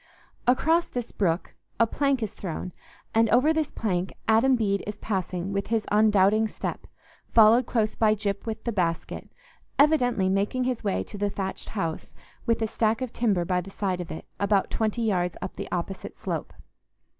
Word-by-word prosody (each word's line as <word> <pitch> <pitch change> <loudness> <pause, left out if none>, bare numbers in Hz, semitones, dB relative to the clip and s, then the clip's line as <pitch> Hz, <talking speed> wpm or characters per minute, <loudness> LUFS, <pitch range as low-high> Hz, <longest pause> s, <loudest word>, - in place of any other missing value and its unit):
Across 320 +7 +3
this 245 -2 -5
brook 175 -3 -1 0.3
a 230 - +6
plank 275 +1 0
is 215 - -4
thrown, 180 0 -5 0.4
and 225 0 +4
over 255 +8 +4
this 315 -2 -1
plank 185 -4 -2
Adam 230 +4 +5
Bede 200 -4 0
is 210 - -4
passing 190 -2 -3
with 200 0 -1
his 225 -1 0
undoubting 210 0 +4
step, - - -5 0.4
followed 230 +2 +6
close 220 -3 +1
by 215 -1 +3
Gyp 200 0 -3
with 220 - -4
the 235 - -1
basket; 170 -5 -2 0.5
evidently 250 -9 +3
making 200 +7 +1
his 250 -2 -2
way 200 -2 0
to 205 - -9
the 205 0 +1
thatched 195 -1 -4
house, 165 -4 -3 0.3
with 230 -1 +2
a - - +1
stack 225 +3 0
of 250 - -5
timber 200 -7 +1
by 180 0 +1
the 190 - -10
side 190 -2 -2
of 175 - -7
it, 160 - -7
about 200 -1 +2
twenty 220 +1 0
yards 180 -5 0
up 185 - -6
the - - -6
opposite 180 +2 -4
slope. - - -4
215 Hz, 180 wpm, -26 LUFS, 190-230 Hz, 0.5 s, a